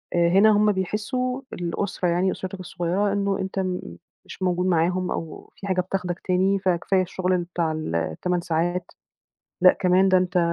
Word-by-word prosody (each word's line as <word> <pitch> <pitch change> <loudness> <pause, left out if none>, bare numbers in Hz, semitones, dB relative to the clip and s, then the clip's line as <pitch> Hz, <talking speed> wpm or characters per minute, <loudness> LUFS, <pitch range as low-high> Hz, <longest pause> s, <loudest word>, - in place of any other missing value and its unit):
هنا 185 +5 +5
هم 210 0 +4
بيحسّوا- 250 +7 -2
الأسرة 180 +1 -2
يعني 180 +2 +1
أسرتك 185 0 -6
الصغيّرة- 185 +3 -1
إنه 200 -1 0
أنت 190 0 -3
م 185 -1 -2 0.4
مش - - -11
موجود 180 0 +1
معاهم 180 +1 +1
أو 165 -2 -6
في 200 - -8
حاجة 185 -1 +1
بتاخدك 180 -1 -3
تاني، 190 +2 +1
فكفاية 185 +1 +1
الشُغل 185 0 -1
بتاع 170 -2 -2
ال 155 - -3
ال8 85 - -1
ساعات، 175 +1 -1 0.7
لأ 185 - +8
كمان 185 +1 +4
ده 185 0 +5
أنت 180 0 0
185 Hz, 160 wpm, -24 LUFS, 175-195 Hz, 0.7 s, لأ